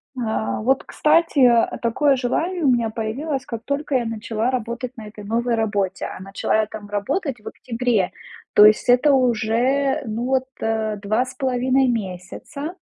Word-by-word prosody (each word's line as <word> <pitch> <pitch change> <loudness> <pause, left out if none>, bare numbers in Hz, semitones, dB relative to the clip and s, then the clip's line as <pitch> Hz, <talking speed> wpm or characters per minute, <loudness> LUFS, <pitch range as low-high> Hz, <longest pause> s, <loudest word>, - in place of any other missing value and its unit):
А, 220 -3 -2
вот, 265 +4 +1
кстати, 300 -5 +3 0.3
такое 270 +4 +2
желание 330 +8 -1
у 285 - +3
меня 235 -2 +1
появилось, 265 +6 -3
как 230 -1 -6
только 280 0 -2
я 245 -2 +1
начала 225 +1 -2
работать 240 +1 -4
на 220 -2 -8
этой 210 0 -11
новой 235 +3 0
работе, 205 -4 -1
а - - -7
начала 195 +2 -2
я - - -1
там 210 -1 -10
работать 240 - -2
в 215 - -14
октябре, 230 -6 -1 0.4
то 210 - +8
есть 215 +3 +4
это 250 +4 +5
уже, 255 +2 +1
ну, 225 +2 -3
вот, 260 0 +1
э, 220 -1 -1
2 215 +5 +1
c 255 - -10
половиной 260 0 +1
месяца. 235 - -5
240 Hz, 165 wpm, -21 LUFS, 220-265 Hz, 0.4 s, то